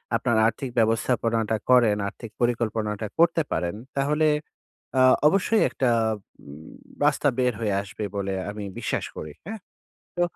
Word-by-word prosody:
আপনার 115 -1 +1
আর্থিক 115 +4 -3
ব্যবস্থাপনাটা 115 0 +1
করেন, 120 -5 +5
আর্থিক 110 +2 -9
পরিকল্পনাটা 110 -3 -1
করতে 170 0 +4
পারেন, 85 +3 -1 0.2
তাহলে 150 +3 +2 0.7
আ - - +6 0.3
অবশ্যই 200 +5 +2
একটা 130 -2 0 0.5
উম 75 +3 -12 0.3
রাস্তা 145 0 +2
বের 125 -1 +2
হয়ে 105 -3 0
আসবে 100 +2 -7
বলে 100 -1 -2 0.2
আমি 105 0 -6 0.2
বিশ্বাস - - -2
করি। 75 - -6
হ্যাঁ? 220 +1 -6 0.6
তো 175 - +1
115 Hz, 135 wpm, -25 LUFS, 105-135 Hz, 0.7 s, আ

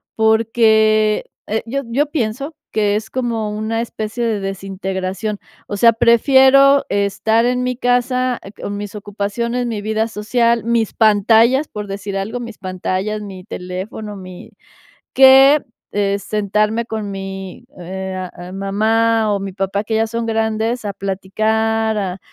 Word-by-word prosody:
porque, 220 -1 +3 0.2
eh, 220 +2 -1
yo 275 +4 -3
yo 275 +6 +1
pienso 275 +2 -2 0.2
que 205 -2 +1
es 220 +1 -6
como 230 -4 -2
una 220 +1 -2
especie 225 0 -4
de 220 -3 0
desintegración. 195 +1 -4 0.3
O 205 - -4
sea, 230 +3 +6
prefiero 265 +4 +5
estar 205 +3 +1
en 250 +1 0
mi 250 -1 -2
casa, 250 0 +1
eh, 195 - -10
con 205 -1 -6
mis 205 -1 -6
ocupaciones, 210 +4 -3
mi 220 -3 -3
vida 220 +1 -1
social, 230 +2 +1
mis 230 -2 0
pantallas, 225 +6 +4
por 210 -1 -6
decir 195 0 -5
algo, 215 +5 -3
mis 235 -3 -8
pantallas, 185 +2 -3
mi 190 -3 -9
teléfono, 200 +2 -6
mi 185 +3 -11 0.6
que, 270 +2 +7 0.3
eh, 200 -1 0
sentarme 215 +2 0
con 215 -3 -4
mi 195 -1 -7
eh, 185 +1 -5
eh, 180 +1 -8
mamá 220 +3 +1
o - - 0
mi 195 0 -5
papá 195 +2 -2
que 220 - -3
ya 225 - +2
son 230 0 -3
grandes 225 +1 -1
a 205 - -2
platicar, 220 +3 -1
a 190 -2 -3
220 Hz, 145 wpm, -18 LUFS, 200-230 Hz, 0.6 s, que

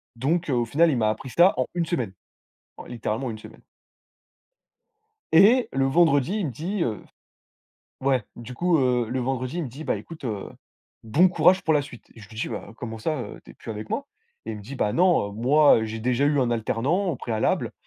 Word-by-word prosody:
donc 155 +7 -1
au 120 -3 +1
final, 160 +7 +3
il 130 - 0
m'a 110 -2 +2
appris 130 +4 -4
ça 175 +8 +5
en 130 - +1
1 170 -2 -1
semaine, 125 - -2 0.6
en - - -10
littéralement 120 +1 -3
1 110 - -7
semaine. - - -14 1.7
Et 220 +9 +6
le 135 0 +1
vendredi 160 +4 +3
il 185 - -1
me - - -3
dit, 170 - -3
heu 110 -4 -2 1.0
ouais, 130 -4 +1
du 120 +2 -9
coup, 175 +4 +2
heu 125 -3 +1
le 130 +2 -2
vendredi 130 +3 -3
il 170 - -2
me - - -5
dit: 145 +6 -9
«Bah - - 0
écoute, 165 -4 -10
heu, 105 -5 -4 0.5
bon 145 +12 +4
courage 185 +1 +4
pour 160 -1 +2
la 145 - +2
suite». 120 -4 -12
Je 105 - -12
lui 110 - -14
dis: 120 - -2
«Bah, - - -7
comment 115 -2 -6
ça, 155 +4 -2
heu, - - -8
tu - - -14
es - - -14
plus - - -9
avec 110 0 -7
moi?», - - -2 0.4
et 110 - -3
il - - -6
me 105 - -10
dit: 125 +8 -8
«Bah, 105 -4 0
non, 175 - +3
heu, - - -11
moi 130 +1 +4
j'ai 110 +1 -5
déjà 125 +4 +1
eu 145 -1 +2
un 125 -2 +1
alternant 125 - 0
au 160 - -1
préalable, 110 -2 -1
130 Hz, 220 wpm, -24 LUFS, 115-160 Hz, 1.7 s, Et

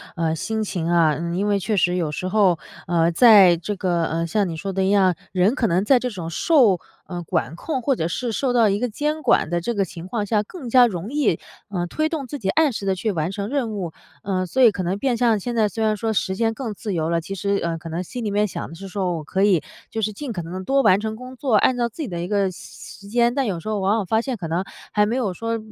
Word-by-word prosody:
呃， 160 -1 0
心 220 +6 -2
情 175 -5 -3
啊。 165 -3 +3
嗯， 170 +2 -3
因 200 +3 0
为 205 -1 +2
确 210 +2 -1
实 180 -1 +2
有 165 -4 -1
时 185 +4 -4
候， 185 -4 +3 0.3
呃， 170 -1 +2
在 195 -3 +7
这 200 +5 -4
个 175 -3 0
呃， 165 +1 -2
像 205 +3 +1
你 165 - -4
说 195 +5 -4
的 190 0 0
一 190 - +2
样， 190 -4 +4 0.2
人 190 +7 +2
可 235 - 0
能 185 -1 +2
在 260 +5 +5
这 250 0 -2
种 175 -5 -6
受， 225 - +3 0.3
呃， 175 -1 -5
管 150 -2 -2
控 265 - -3
或 275 +2 +1
者 160 - -1
是 235 +7 -3
受 250 +2 0
到 230 -3 +4
一 200 - +1
个 250 - 0
监 300 +7 -2
管 245 - +3
的 175 0 0
这 235 +7 -2
个 200 -3 +1
情 175 -2 -8
况 205 0 -3
下， 210 -1 +1
更 275 - -9
加 250 +1 +7
容 195 -1 -4
易， 280 - +1 0.3
呃， 175 -3 -2
推 310 - 0
动 310 -5 -4
自 290 - -5
己 195 -8 -3
按 310 +6 +3
时 210 -4 -5
地 195 - +2
去 210 +4 -1
完 165 0 -2
成 200 +1 -4
任 260 -4 -1
务。 185 -6 -4 0.3
呃， 185 -2 -1
所 260 +9 -1
以 245 - +8
可 200 -3 -3
能 185 +3 -2
变 245 0 0
相 230 -3 +3
现 240 +4 -4
在 215 -2 +3
虽 225 +2 -3
然 215 -1 +1
说 225 +1 -1
时 190 -1 0
间 225 +2 +1
更 225 -3 -5
自 205 -2 -4
由 160 -1 -1
了， 170 0 +1
其 170 +4 -7
实， 200 +1 -1
呃， 165 -1 -1
可 165 - -8
能 170 +3 -3
心 245 +6 -6
里 210 - -1
面 205 +1 +2
想 - - -6
的 165 - -10
是 195 +3 -9
说 185 -2 -2
我 155 - -6
可 190 +5 -2
以， 190 -6 +3 0.3
就 220 -1 -3
是 215 0 -1
尽 265 +3 -6
可 175 -5 -4
能 170 +2 -8
地 190 - -6
多 275 0 +2
完 200 -4 +5
成 220 +1 -3
工 255 +2 -10
作， 255 -4 0
按 250 +4 +4
照 235 -1 0
自 310 +8 -6
己 - - -4
的 175 -4 -4
一 175 - -3
个 200 -2 +1
时 - - -12
时 200 - -14
间。 235 +2 +2
但 275 0 0
有 190 -7 -2
时 190 - -6
候 215 -2 -1
往 195 +2 +2
往 205 - -1
发 220 +5 +1
现 260 +1 -3
可 175 -5 -5
能， 170 +4 -1 0.3
还 210 0 +3
没 230 - -1
有 215 -8 -1
说 230 +5 -2
200 Hz, 310 characters per minute, -22 LUFS, 175-230 Hz, 0.3 s, 以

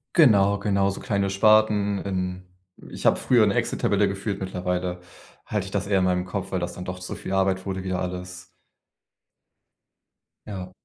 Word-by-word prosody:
Genau, 100 - +5
genau, 100 -1 +1
so 100 - -4
kleine 100 -4 -1
Sparten, 105 0 +3
in 90 -1 -3 0.5
ich - - -8
habe - - +5
früher 120 -4 +4
'ne 100 - +2
Excel-Tabelle 100 0 +1
geführt, 100 +1 -3
mittlerweile 90 -1 -3 0.4
halte 105 -3 -2
ich 95 - -9
das 100 -1 -2
eher 100 -2 +3
in 95 - +2
meinem 90 0 +1
Kopf, 95 +1 -5
weil 95 - 0
das 90 0 -4
dann 90 - -8
doch 90 0 -5
zu 90 - -6
viel 95 - -6
Arbeit 95 -1 +1
wurde 95 -1 -3
wieder 95 -1 -2
alles. 90 0 -5 2.0
Ja. 95 -3 -6
95 Hz, 170 wpm, -25 LUFS, 90-100 Hz, 2.0 s, Genau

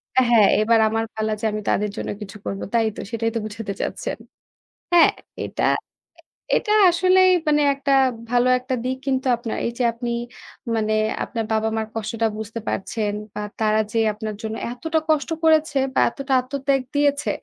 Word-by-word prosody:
অ্যা 260 - +5
হ্যাঁ, 215 -4 +6
এবার 225 +1 +4
আমার 225 +1 -1
পালা 220 0 -1
যে 225 - -4
আমি 215 0 -3
তাদের 210 +1 +1
জন্য - - -4
কিছু 210 0 -8
করবো। 195 - -4
তাই 225 -1 +3
তো - - -6
সেটাই 225 0 0
তো - - +1
বুঝাতে 210 -1 -5
চাচ্ছেন। - - -3 0.8
হ্যাঁ, 340 - +7 0.3
এটা - - -4 0.7
এ - - -4
এটা 425 -2 +1 0.2
আসলেই 370 +1 +4 0.2
মানে 295 0 +4
একটা 275 0 -2 0.4
ভালো 245 0 +3
একটা 255 +1 -3
দিক 260 +1 -2
কিন্তু 265 0 0
আপনার। 235 -2 -4
এই - - -1
যে - - +2
আপনি 240 +1 -5 0.7
মানে 215 -1 0 0.3
আপনার 230 -3 -3
বাবা-মার 220 0 0
কষ্টটা 225 +1 -1
বুঝতে 220 +1 -5
পারছেন 210 +1 -2 0.2
বা - - -5 0.2
তারা 215 0 +2
যে 230 - -2 0.2
আপনার 215 0 -5
জন্য 220 0 -3 0.2
এতটা 320 +6 -1
কষ্ট 310 +1 +2
করেছে 315 -2 +3 0.2
বা - - +2
এতটা 275 +2 -4
আত্মত্যাগ 270 +1 -1
দিয়েছে, 285 0 +2
235 Hz, 170 wpm, -22 LUFS, 220-275 Hz, 0.8 s, হ্যাঁ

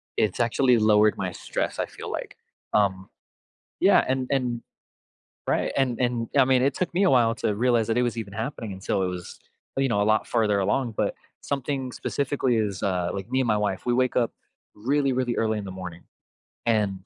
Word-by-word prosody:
it's 105 0 0
actually 120 +1 +3
lowered 105 -1 +4
my 90 -2 -3
stress, - - -3
I - - +1
feel - - -9
like. - - -6 0.4
Um, 95 -2 +1 0.7
yeah, - - +5
and 130 0 0
and 125 -4 0 0.9
right, - - 0
and 130 -4 +1
and, 120 -2 0
I 135 - +7
mean, 130 -1 +3
it 140 0 +2
took 180 -2 -2
me 190 - +2
a 190 - +5
while 115 -3 +4
to 105 - 0
realize 120 0 +2
that 115 - +1
it - - +3
was 120 -1 -1
even 105 -3 -5
happening 110 0 -4
until 95 0 -1
it - - +1
was, 90 -1 -6 0.4
you 135 0 +2
know, 100 -3 +1
a - - +2
lot 110 +1 +2
further 110 -4 +2
along, 115 +3 0
but - - 0 0.3
something 135 -1 -3
specifically 135 -3 -1
is, 100 -4 -1
uh, 90 -2 0
like, 95 +1 -5
me 130 - +1
and 130 - +1
my 105 - +3
wife, 100 -2 -1
we 120 - +2
wake 130 0 +2
up 120 -2 +2 0.4
really, 135 +5 +1
really 125 -1 0
early 110 -1 +1
in 105 - -5
the 95 - -6
morning, 90 -2 -8 0.6
and 100 -5 0
115 Hz, 205 wpm, -25 LUFS, 100-130 Hz, 0.9 s, I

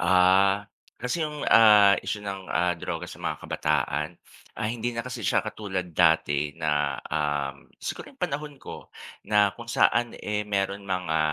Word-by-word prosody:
Ah, 95 +3 +4 0.3
kasi 125 +7 -2
yung, 150 -1 -5
ah, 105 -3 +8
isyu 105 - -4
ng, 95 -1 -5
ah, 90 0 +1
droga 85 +2 -4
sa - - -11
mga - - -2
kabataan, 75 +3 -1 0.5
ah, 110 -1 -1
hindi 120 0 -3
na 115 - -2
kasi 125 -2 -6
siya - - +2
katulad 95 -4 -4
dati 75 -3 +2
na, 75 -4 0
um, 75 -2 -2 0.2
siguro - - -5
yung - - -23
panahon 145 0 -3
ko - - -10 0.4
na 105 -1 +4
kung 120 - -9
saan 120 0 +2
eh, 105 0 -3
meron 100 0 -2
mga, 90 -4 -1
100 Hz, 160 wpm, -26 LUFS, 80-110 Hz, 0.5 s, ah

